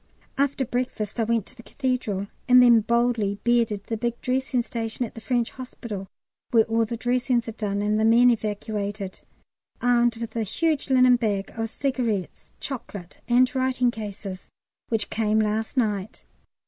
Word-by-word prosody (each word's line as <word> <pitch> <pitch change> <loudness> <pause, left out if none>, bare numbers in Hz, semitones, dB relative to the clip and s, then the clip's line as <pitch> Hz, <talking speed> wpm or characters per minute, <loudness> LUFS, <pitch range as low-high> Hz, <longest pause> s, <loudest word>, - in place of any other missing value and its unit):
After 275 -1 +1
breakfast 245 -3 -3
I 225 - +2
went 230 -2 +1
to - - -15
the 240 - -12
Cathedral, 245 -7 -2 0.2
and 250 0 +8
then 240 -2 +7
boldly 230 -2 +1
bearded 230 -4 +2
the 225 - -3
big 235 +1 -2
dressing 255 -1 0
station 230 +1 -3
at - - -10
the 225 - -9
French 240 -1 0
Hospital, 230 -6 -7 0.4
where 230 -3 +5
all 225 +1 +1
the 235 +2 -4
dressings 245 0 0
are - - -3
done 205 -2 -2
and 210 +1 +1
the - - +2
men 235 +2 +6
evacuated, 205 -2 -3 0.6
armed 240 -1 +3
with 230 0 -6
a 230 - 0
huge 305 - 0
linen 255 -1 +6
bag 205 -4 -1
of 225 0 -2
cigarettes, 240 -7 -2
chocolate, 210 -9 -7
and 250 +2 +4
writing 255 -2 +1
cases 200 -4 -7 0.4
which 220 -3 -1
came 215 -1 +1
last 220 +3 0
night. 210 -4 -1
230 Hz, 160 wpm, -25 LUFS, 215-245 Hz, 0.6 s, and